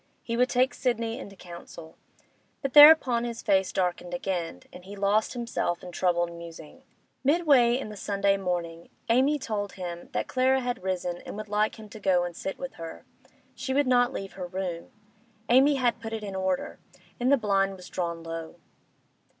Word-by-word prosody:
He 230 - -3
would 250 +2 +2
take 255 +2 +2
Sidney 230 -2 -1
into 200 - -9
council. 170 -2 -11 0.7
But 275 - -2
thereupon 290 -5 +8
his 235 -1 -5
face 195 -3 +2
darkened 180 -1 -2
again, 175 - -3
and 180 - -11
he 200 +2 -9
lost 205 +2 +1
himself 235 -8 -2
in 180 - -8
troubled 175 -1 0
musing. 165 -2 -11 0.4
Midway 275 -5 +4
in 260 - -5
the 210 - -8
Sunday 200 -1 +1
morning 175 -3 -4 0.2
Amy 265 +6 +3
told 210 -6 -4
him 175 -2 -7
that - - -1
Clara 260 +1 +2
had 245 0 -3
risen 180 -2 -2
and - - -9
would 215 -1 -7
like 210 +1 +1
him 220 -1 -11
to 220 - -10
go 185 -3 +2
and 175 -1 -5
sit 195 - -5
with 270 0 -6
her. 165 0 -8 0.5
She 265 - -3
would 285 +1 +3
not 245 -1 +3
leave 195 -6 -6
her 180 -2 -6
room; 180 -2 -5 0.6
Amy 270 +4 +5
had 245 -3 +1
put 225 0 -6
it 220 -1 -4
in 200 -2 -5
order, 190 -1 -2 0.4
and 250 +2 +2
the 280 - +6
blind 195 -3 +1
was 180 -1 -12
drawn 170 -2 -4
low. 165 -1 -6
200 Hz, 180 wpm, -27 LUFS, 180-245 Hz, 0.7 s, thereupon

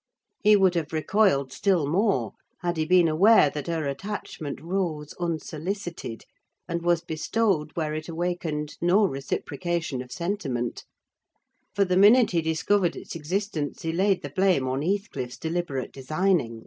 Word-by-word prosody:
He 210 0 +6
would 190 -3 +4
have 165 -3 -2
recoiled 155 -5 +2
still 185 -7 +2
more 195 +8 +1 0.3
had 175 -1 -1
he 155 - +1
been 180 0 +5
aware 160 -1 +5
that 150 -2 -5
her 165 -3 -1
attachment 150 -2 -5
rose 165 -3 -3
unsolicited, 170 - -4 0.4
and 170 -1 -2
was 170 0 +1
bestowed 165 0 0
where 155 -2 -1
it 155 +2 -5
awakened 165 -3 -3
no 185 +5 +4
reciprocation 150 0 -3
of 125 -1 -11
sentiment; 145 - -3 0.9
for 200 0 +3
the 180 0 +1
minute 220 +5 +6
he 170 -2 +2
discovered 165 +4 +1
its - - -8
existence 165 -2 -3
he 165 - -1
laid 190 +3 +1
the 145 - -6
blame 185 -6 +2
on 130 +2 -1
Heathcliff's 165 - -2
deliberate 160 -5 -3
designing. 140 -3 0
170 Hz, 145 wpm, -26 LUFS, 150-190 Hz, 0.9 s, He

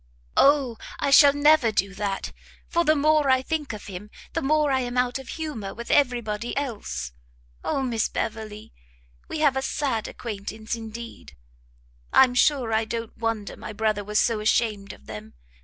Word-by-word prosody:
"O, 275 -5 +4 0.2
I 280 - 0
shall 280 0 +8
never 290 -4 +4
do 195 -1 0
that! 195 -1 -3 0.4
for 340 -1 +1
the 310 -1 +4
more 305 -1 +3
I 260 0 +4
think 310 -1 -2
of 215 - -8
him, 200 +1 -8 0.2
the - - -1
more 300 +1 +2
I 265 - +2
am 245 -1 -3
out 250 +1 +1
of 265 - -11
humour 290 -12 -5
with 235 0 -6
every 250 -4 +3
body 215 +3 -4
else! 205 - -4 0.5
O 275 - -1
Miss 235 -4 0
Beverley! 220 -1 -5 0.5
we 310 - -4
have 285 -4 +4
a 265 - 0
sad 265 -5 -1
acquaintance 220 0 -6
indeed! 230 - -8 0.8
I'm 255 -2 +6
sure 250 -3 +2
I 220 +1 +2
don't 230 0 -5
wonder 225 -3 -3
my 215 - -8
brother 215 -1 0
was 210 +1 0
so 230 -2 +2
ashamed 210 -2 0
of - - -15
them. 105 +1 -9
235 Hz, 175 wpm, -25 LUFS, 215-275 Hz, 0.8 s, shall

